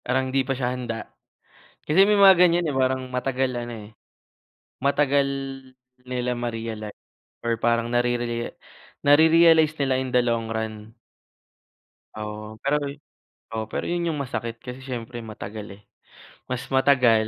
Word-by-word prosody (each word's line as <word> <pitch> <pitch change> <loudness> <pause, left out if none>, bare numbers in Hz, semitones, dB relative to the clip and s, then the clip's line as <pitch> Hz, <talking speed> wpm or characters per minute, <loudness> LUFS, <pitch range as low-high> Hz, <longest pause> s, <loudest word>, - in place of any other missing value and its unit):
parang 130 +1 -1
hindi 135 0 +1
pa 135 - 0
siya 125 -1 -1
handa 120 -3 -5 0.7
kasi 190 +6 +4
may 210 - +4
mga 195 -2 +8
ganyan 170 -3 +4
eh, - - -5
parang 130 -1 0
matagal 130 0 -1
ano 120 0 -6
eh, 105 -1 -10 1.0
matagal 140 -1 +3 0.8
nila 125 -1 -2
ma-realize 115 -3 -4 0.5
or 115 -1 0
parang 115 0 +1
narere 120 -1 -1 0.5
nare-realize 160 +1 +6
nila 130 -1 +2
in 130 -1 -3
the 125 - +5
long 115 -2 0
run. 110 0 -5 1.2
Oo 105 0 -6
pero 140 +2 +2 0.8
oo 110 -1 -2
pero - - -3
'yon 175 0 -1
yung 150 - -4
masakit 115 -3 -4
kasi 125 0 -7
syempre 120 -2 -5
matagal 105 -1 -7
eh, - - -21 0.7
mas 130 -1 -2
matagal, 125 -5 +4
125 Hz, 135 wpm, -24 LUFS, 115-135 Hz, 1.2 s, mga